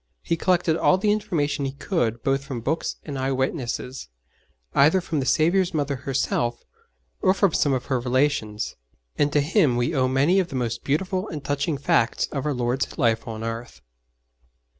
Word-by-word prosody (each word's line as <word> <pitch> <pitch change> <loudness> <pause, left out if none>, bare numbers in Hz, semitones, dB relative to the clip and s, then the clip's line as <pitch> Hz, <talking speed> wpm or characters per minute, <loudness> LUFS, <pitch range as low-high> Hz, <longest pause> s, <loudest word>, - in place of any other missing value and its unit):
He 170 - 0
collected 175 -1 +2
all 185 - +3
the 205 +2 +2
information 160 -9 -1
he 135 -1 -2
could 120 - -1
both 135 0 +1
from 135 -4 -5
books 160 +8 -1
and 140 -3 -5
eye 135 +1 0
witnesses 130 - -3 0.7
either 155 +7 +5
from 165 -4 -2
the 135 - -2
Saviour's 175 +2 +2
Mother 145 -2 0
herself, 130 -2 -1 0.6
or 185 - +4
from 195 -4 +2
some 145 - +2
of 130 -1 -2
her 130 -3 0
relations 125 -4 0 0.4
and 145 0 +2
to 145 - +3
him 150 - +2
we 120 +7 0
owe 130 -3 +2
many 140 +9 +3
of 185 - 0
the 135 - -7
most 120 -2 -2
beautiful 185 +7 -1
and 150 -4 -6
touching 145 +2 -1
facts 120 -4 +1
of 140 0 -2
our 150 - +1
Lord's 125 +2 -1
life 115 -4 +1
on 110 -1 -5
earth. 115 +1 -5
140 Hz, 180 wpm, -24 LUFS, 125-165 Hz, 0.7 s, either